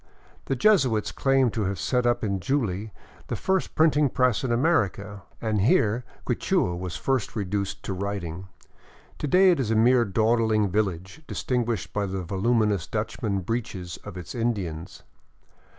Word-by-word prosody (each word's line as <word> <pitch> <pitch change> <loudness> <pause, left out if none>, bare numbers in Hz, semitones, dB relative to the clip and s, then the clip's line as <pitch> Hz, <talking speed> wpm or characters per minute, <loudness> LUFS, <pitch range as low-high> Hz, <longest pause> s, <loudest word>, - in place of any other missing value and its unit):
The 135 - -1
Jesuits 130 - +3
claim 135 -3 +2
to 110 -2 -2
have 95 +1 -2
set 125 +3 +1
up 120 - +1
in 100 -3 -1
Juli 110 -3 -1 0.4
the - - -2
first 190 -1 -1
printing 150 -3 +4
press 125 -1 +1
in 130 - -1
America, 115 - 0 0.2
and 110 -3 0
here 120 - +2 0.2
Quichua 90 -1 0
was 90 -1 -5
first 130 -7 -1
reduced 100 -1 -3
to 95 - -3
writing. 95 -2 -4 0.7
To - - -2
day 185 +4 +6
it 170 - +1
is 125 -5 -1
a 110 - +2
mere 120 +2 +5
dawdling 110 -1 +2
village, 95 - -2
distinguished 120 -8 -2
by 105 -1 -1
the 95 -1 -4
voluminous 105 +1 +1
Dutchman 100 -2 -2
breeches 95 -4 -4
of 105 -3 -8
its 90 -1 -7
Indians. 95 -9 -3
110 Hz, 150 wpm, -25 LUFS, 95-125 Hz, 0.7 s, day